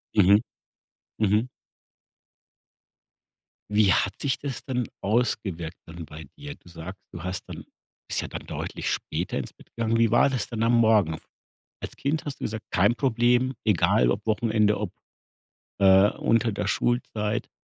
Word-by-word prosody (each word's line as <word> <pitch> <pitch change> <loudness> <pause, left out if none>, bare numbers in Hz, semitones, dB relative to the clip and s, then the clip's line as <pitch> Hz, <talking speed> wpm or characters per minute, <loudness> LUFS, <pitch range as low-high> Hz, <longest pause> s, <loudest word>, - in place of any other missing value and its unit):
Mhm, 100 0 +6 0.8
mhm. 110 +3 +2 2.2
Wie 105 -2 +4
hat 95 - +1
sich 135 -3 0
das 140 -4 -5
denn 125 -4 -2
ausgewirkt 100 -7 -1
dann 85 0 -9
bei 75 +1 -10
dir? 145 0 -8
Du - - -19
sagst: 90 +4 -9
„Du 80 - -8
hast 90 0 -4
dann - - -8 0.4
bist - - 0
ja - - -5
dann - - -7
deutlich - - -4
später - - -2
ins - - -5
Bett - - -19
gegangen“. 115 0 0
Wie 115 -1 +3
war 120 - +5
das 130 -6 -2
dann 115 -2 -3
am 115 +1 +3
Morgen? 105 -8 +3 0.6
Als - - -7
Kind 150 +3 -1
hast 145 -2 -6
du - - -5
gesagt: 110 0 -4
„Kein 100 +6 +3
Problem, 125 +1 +2
egal 100 0 +3
ob 100 +2 -3
Wochenende, 110 -1 +2
ob, 105 -4 -3 0.9
äh, 95 +1 +6
unter 115 0 +1
der 100 - -3
Schulzeit“, 115 -2 -1
110 Hz, 155 wpm, -26 LUFS, 95-120 Hz, 2.2 s, Mhm